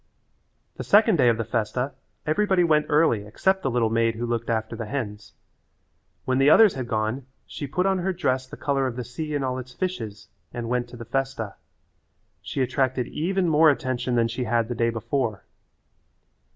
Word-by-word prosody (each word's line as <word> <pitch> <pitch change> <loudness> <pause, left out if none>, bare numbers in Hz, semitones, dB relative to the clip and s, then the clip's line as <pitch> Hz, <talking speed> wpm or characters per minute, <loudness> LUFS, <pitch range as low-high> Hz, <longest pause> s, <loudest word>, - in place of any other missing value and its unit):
The - - -4
second 210 -2 +5
day 125 -4 +5
of 115 - +2
the 115 - -1
festa 115 +4 -2 0.3
everybody 190 +3 +2
went 155 -3 +3
early 150 -9 +3
except 190 - +1
the 135 - 0
little 115 -3 +1
maid 115 0 +2
who 120 +2 -3
looked 120 0 -2
after 110 0 -1
the 115 -1 -5
hens. 105 -5 -5 0.9
When 130 0 +1
the 135 +2 +5
others 215 +4 +7
had 130 -3 -5
gone 115 +3 -2 0.2
she 145 - -6
put 180 +7 -1
on 190 -1 +2
her 190 +2 0
dress 130 -8 -1
the - - -10
colour 135 -2 0
of 125 - -4
the 125 - -4
sea 150 +6 -5
and 140 -2 -1
all 130 0 -2
its 125 0 -9
fishes 110 - -4 0.2
and 120 -1 -5
went 125 0 0
to 120 - -11
the 115 - -8
festa. 130 -4 -2 0.9
She - - -3
attracted 130 -1 0
even 185 +3 0
more 160 0 +5
attention 130 -3 -1
than 115 -1 +3
she 120 +2 -3
had 115 0 0
the - - -1
day 115 0 +1
before. 115 -1 -2
125 Hz, 190 wpm, -25 LUFS, 115-150 Hz, 0.9 s, others